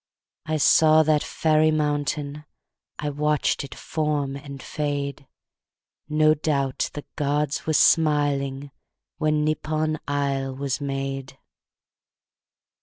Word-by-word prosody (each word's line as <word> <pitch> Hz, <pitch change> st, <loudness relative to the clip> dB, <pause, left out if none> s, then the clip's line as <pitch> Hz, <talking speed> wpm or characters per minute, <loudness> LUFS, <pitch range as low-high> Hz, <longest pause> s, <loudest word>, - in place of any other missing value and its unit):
I 155 Hz, 0 st, 0 dB
saw 155 Hz, +1 st, +5 dB
that 155 Hz, -1 st, +2 dB
fairy 155 Hz, 0 st, +2 dB
mountain.... 150 Hz, -1 st, -1 dB, 0.5 s
I 150 Hz, 0 st, -3 dB
watched 150 Hz, 0 st, 0 dB
it 140 Hz, -, -9 dB
form 150 Hz, -3 st, -2 dB
and 140 Hz, 0 st, -8 dB
fade. 140 Hz, -1 st, -4 dB, 0.8 s
No 155 Hz, 0 st, +4 dB
doubt 140 Hz, -3 st, -1 dB
the 145 Hz, -, -7 dB
gods 145 Hz, +1 st, -1 dB
were 160 Hz, -, +1 dB
smiling, 145 Hz, -3 st, +2 dB, 0.5 s
When 155 Hz, -1 st, +1 dB
Nippon 155 Hz, 0 st, -1 dB
isle 140 Hz, -2 st, -1 dB
was 140 Hz, +1 st, -3 dB
made. 135 Hz, -1 st, -4 dB
145 Hz, 105 wpm, -24 LUFS, 140-155 Hz, 0.8 s, saw